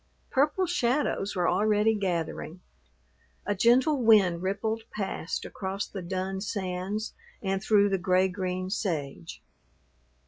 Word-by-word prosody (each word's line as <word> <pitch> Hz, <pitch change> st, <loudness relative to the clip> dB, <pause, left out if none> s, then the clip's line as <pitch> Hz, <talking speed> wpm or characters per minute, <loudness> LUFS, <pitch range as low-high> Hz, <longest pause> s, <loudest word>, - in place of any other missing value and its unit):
Purple 295 Hz, +7 st, +2 dB
shadows 260 Hz, -, 0 dB
were 180 Hz, -2 st, +1 dB
already 210 Hz, +3 st, +3 dB
gathering. 175 Hz, -4 st, -3 dB, 0.9 s
A 205 Hz, -, +1 dB
gentle 250 Hz, +7 st, +3 dB
wind 200 Hz, -7 st, +5 dB
rippled 200 Hz, +4 st, -1 dB
past 190 Hz, -4 st, -4 dB
across 195 Hz, +1 st, -4 dB
the 195 Hz, -, -7 dB
dun 190 Hz, +2 st, -3 dB
sands 195 Hz, +1 st, -3 dB, 0.3 s
and 195 Hz, -1 st, -1 dB
through 205 Hz, -1 st, +4 dB
the 195 Hz, -1 st, 0 dB
gray 185 Hz, +1 st, +3 dB
green 185 Hz, -1 st, -3 dB
sage. 145 Hz, -, -3 dB
195 Hz, 115 wpm, -28 LUFS, 185-215 Hz, 0.9 s, wind